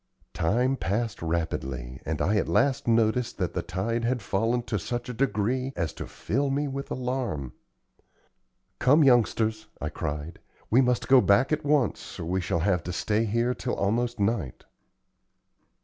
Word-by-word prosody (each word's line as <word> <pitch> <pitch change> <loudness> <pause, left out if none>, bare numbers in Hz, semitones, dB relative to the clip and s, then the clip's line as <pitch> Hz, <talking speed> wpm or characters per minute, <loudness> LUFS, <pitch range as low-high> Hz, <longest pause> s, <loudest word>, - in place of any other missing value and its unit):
Time 125 +10 +1
passed 110 0 -2
rapidly, 70 -7 -3
and 80 -1 -1
I 105 +2 +2
at - - 0
last 135 -3 +2
noticed 115 +1 +2
that - - -2
the - - -1
tide 115 +6 -2
had 120 -1 0
fallen 115 +5 0
to 105 -3 -2
such 120 +7 -4
a - - -3
degree 130 +1 0
as 85 -3 -2
to - - -7
fill 140 +5 -1
me 145 +2 0
with 140 0 -5
alarm. 125 - -3 1.3
"Come, 145 +5 +5
youngsters," 110 -4 +2
I - - -3
cried, 75 +3 -5 0.3
"we 125 +4 +6
must 125 -1 +1
go 130 -1 +7
back 100 +8 +3
at 155 - -1
once, 145 -5 0
or - - -4
we 95 +3 0
shall 85 -2 -1
have 90 -1 +2
to 90 - -3
stay 105 +5 0
here 115 +3 +1
till 125 - -3
almost 115 +3 0
night." 100 - -1
115 Hz, 165 wpm, -27 LUFS, 95-125 Hz, 1.3 s, go